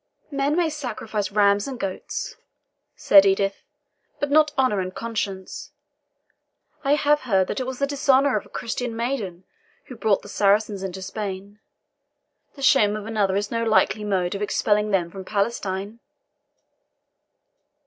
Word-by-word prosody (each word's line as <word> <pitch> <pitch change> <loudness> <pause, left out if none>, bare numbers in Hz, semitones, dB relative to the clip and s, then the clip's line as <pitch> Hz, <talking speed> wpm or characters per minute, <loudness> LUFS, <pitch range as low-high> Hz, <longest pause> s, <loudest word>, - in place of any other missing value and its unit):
"Men 280 +1 0
may 340 -2 +1
sacrifice 225 -8 -4
rams 200 +1 +3
and 260 -3 -6
goats," 195 - -4 0.6
said 195 -1 +6
Edith, 195 0 +1 0.6
"but 290 0 -2
not 305 0 +5
honour 255 -7 +2
and 185 0 -4
conscience. 205 -5 -5 1.1
I 280 +1 +3
have 295 0 +3
heard 195 -7 +2
that - - -2
it 255 - -3
was 260 -1 -4
the 280 - +1
dishonour 280 -2 +2
of 210 - -1
a - - -19
Christian 235 0 -4
maiden 225 -7 -3 0.4
which 250 - -10
brought 215 -3 +2
the - - -11
Saracens 205 0 +1
into 190 0 -5
Spain; 200 0 -6 1.0
the 275 - -9
shame 210 -6 +4
of 210 -1 -6
another 210 -4 0
is 205 +1 -2
no 230 0 -1
likely 215 -1 +2
mode 185 -4 0
of 200 - -5
expelling 210 0 +1
them 180 -4 0
from 195 +1 -8
Palestine." 200 0 -2
210 Hz, 150 wpm, -23 LUFS, 195-260 Hz, 1.1 s, said